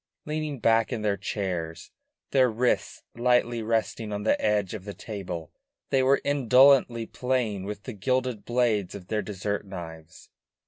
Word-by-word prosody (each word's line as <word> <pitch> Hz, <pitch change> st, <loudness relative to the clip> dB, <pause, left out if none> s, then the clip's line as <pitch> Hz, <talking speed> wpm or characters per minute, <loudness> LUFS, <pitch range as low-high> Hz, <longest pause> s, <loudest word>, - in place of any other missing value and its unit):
Leaning 150 Hz, -1 st, -3 dB
back 115 Hz, 0 st, +3 dB
in 115 Hz, -4 st, -3 dB
their 105 Hz, -1 st, +2 dB
chairs, 90 Hz, -5 st, -4 dB, 0.4 s
their 130 Hz, -2 st, +4 dB
wrists 120 Hz, +2 st, 0 dB
lightly 120 Hz, -1 st, +2 dB
resting 110 Hz, 0 st, -1 dB
on 105 Hz, 0 st, -3 dB
the 110 Hz, -, +2 dB
edge 105 Hz, -3 st, +1 dB
of 105 Hz, -4 st, -6 dB
the 100 Hz, 0 st, -7 dB
table, 90 Hz, -7 st, -6 dB, 0.4 s
they 135 Hz, -, +4 dB
were 135 Hz, +1 st, +4 dB
indolently 130 Hz, -3 st, +4 dB
playing 120 Hz, -6 st, -1 dB
with 105 Hz, 0 st, -6 dB
the 125 Hz, -, -6 dB
gilded 125 Hz, 0 st, -1 dB
blades 115 Hz, -6 st, 0 dB
of 95 Hz, -3 st, -10 dB
their 110 Hz, -1 st, 0 dB
dessert 100 Hz, 0 st, -3 dB
knives. 80 Hz, -5 st, -10 dB
110 Hz, 150 wpm, -27 LUFS, 100-125 Hz, 0.4 s, their